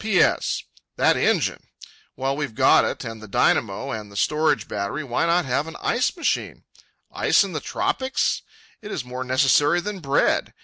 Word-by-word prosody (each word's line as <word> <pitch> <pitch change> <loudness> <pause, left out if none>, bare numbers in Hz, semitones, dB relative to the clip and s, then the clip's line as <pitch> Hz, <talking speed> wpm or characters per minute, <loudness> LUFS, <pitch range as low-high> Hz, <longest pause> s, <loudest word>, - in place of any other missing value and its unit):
P.S.—That 215 -4 +1
engine! - - 0 0.5
While 135 +1 -1
we've 140 -6 -4
got - - +5
it, - - -3
and 115 -1 -7
the 110 - -10
dynamo, 105 +5 +1
and 105 -3 -6
the 100 - -9
storage 150 -6 +1
battery, 105 +10 -3
why 130 +4 -1
not 170 0 +2
have 135 +4 -1
an 165 - -8
ice 250 +9 0
machine? 335 - -2 0.5
Ice - - +3
in 195 -3 -6
the 155 - -2
tropics! 280 - -1 0.4
It 215 0 -8
is 125 - -4
more 125 +1 -5
necessary 140 +5 +3
than 200 +2 -5
bread. 140 -4 +1
145 Hz, 165 wpm, -23 LUFS, 125-180 Hz, 0.5 s, got